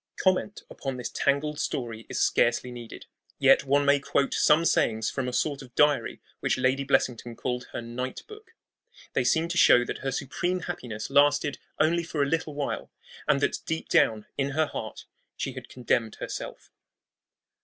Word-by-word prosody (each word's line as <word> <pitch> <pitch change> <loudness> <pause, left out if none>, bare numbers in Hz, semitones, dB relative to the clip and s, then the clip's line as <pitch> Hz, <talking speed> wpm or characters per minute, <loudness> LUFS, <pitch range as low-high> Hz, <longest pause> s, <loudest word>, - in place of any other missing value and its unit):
Comment 190 +2 0
upon 135 -2 -5
this 125 - -5
tangled 145 +2 0
story 115 -6 -3
is - - -3
scarcely 120 +1 +2
needed. 120 -2 -9 0.3
Yet - - +5
one 140 +1 +3
may 140 0 +5
quote 140 0 0
some 160 +2 +4
sayings 110 -8 +2
from 130 -2 -3
a - - -2
sort 140 +2 -1
of 125 -2 -14
diary 150 -1 +2 0.2
which - - 0
Lady 130 +2 +1
Blessington 120 -3 0
called 125 0 -3
her - - -6
"Night 125 +2 -5
Book." 435 0 -14 0.6
They - - +1
seem 160 +1 +2
to 175 0 0
show 120 0 +6
that - - -5
her 135 - -2
supreme 175 +7 -2
happiness 125 -10 -5
lasted 145 0 +3 0.2
only 165 +2 +3
for 160 -3 -1
a - - 0
little 160 -1 -2
while, 145 -1 -3 0.4
and 140 - +3
that - - +1
deep 160 0 -3
down 110 -2 +3
in 140 0 +1
her 160 - +4
heart 110 -6 -7 0.3
she - - -3
had - - -9
condemned 120 -3 -1
herself. - - -7
140 Hz, 175 wpm, -27 LUFS, 125-150 Hz, 0.6 s, show